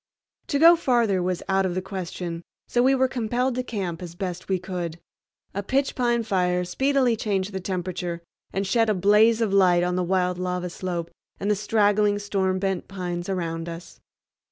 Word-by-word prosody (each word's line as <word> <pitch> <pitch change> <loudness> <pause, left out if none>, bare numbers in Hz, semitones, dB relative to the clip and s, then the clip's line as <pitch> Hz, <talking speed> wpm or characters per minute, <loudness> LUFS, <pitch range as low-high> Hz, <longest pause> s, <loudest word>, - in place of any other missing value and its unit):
To 285 - 0
go 335 +4 +8
farther 235 - +2
was 180 0 -2
out 195 0 +2
of 180 -2 -1
the 185 - -1
question, 180 -3 -5 0.3
so 245 - +2
we 265 +2 +4
were 260 0 +3
compelled 250 +1 -1
to 255 - -1
camp 190 -9 -4
as 170 -1 -8
best 180 0 -5
we 190 - +2
could. 175 -2 -5 0.5
A 200 - -2
pitch 270 +7 0
pine 240 -2 +1
fire 180 -3 +1
speedily 265 +4 +2
changed 205 -2 -1
the 190 - -2
temperature 180 -2 -4 0.3
and 195 +1 -1
shed 225 +3 +2
a 215 - +2
blaze 210 +4 +4
of 215 -4 +1
light 180 -3 +5
on 180 0 0
the 180 - +1
wild 180 0 0
lava 180 -1 -2
slope 170 -2 -4 0.3
and 200 +2 0
the - - +3
straggling 205 0 +2
storm 195 -2 0
bent 190 -1 -2
pines 180 -2 -4
around 165 -3 -3
us. 170 +1 -9
190 Hz, 185 wpm, -25 LUFS, 180-220 Hz, 0.5 s, go